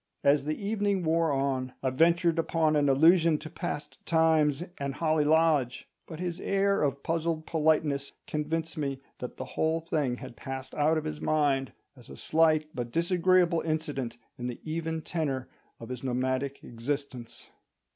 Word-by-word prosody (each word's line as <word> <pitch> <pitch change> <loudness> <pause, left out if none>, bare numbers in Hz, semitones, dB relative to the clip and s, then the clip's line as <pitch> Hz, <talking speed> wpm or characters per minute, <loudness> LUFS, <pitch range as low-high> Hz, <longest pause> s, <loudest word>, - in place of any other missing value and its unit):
As 140 0 +4
the 155 0 -2
evening 205 -2 0
wore 165 0 +2
on, 135 -2 -1
I 130 - +1
ventured 170 +3 +3
upon 160 -1 +2
an 145 -1 +3
allusion 165 +3 +5
to 155 0 -9
past 150 0 -5
times 160 -2 +3 0.2
and 140 -1 -3
Holly 155 -2 +2
Lodge; 150 -5 +2 0.2
but 160 -2 -8
his 175 -1 -3
air 200 0 +1
of 140 -1 0
puzzled 165 -1 -1
politeness 150 -3 +1
convinced 160 +1 -3
me 140 -2 -2 0.2
that 125 - -6
the 130 - -5
whole 160 +4 0
thing 155 -7 -1
had 130 -2 -9
passed 135 +1 -7
out 155 +1 +2
of 155 - -2
his 75 -1 -5
mind, 140 -4 +1 0.2
as 125 -4 -16
a - - -10
slight 155 -1 +3
but 120 -2 -4
disagreeable 175 +1 +3
incident 145 -7 -3 0.2
in 125 - -3
the 125 - -5
even 160 0 -3
tenor 140 -6 -2 0.3
of 115 - -9
his 125 0 -6
nomadic 130 +2 -1
existence. 125 0 -5
155 Hz, 160 wpm, -29 LUFS, 135-165 Hz, 0.3 s, allusion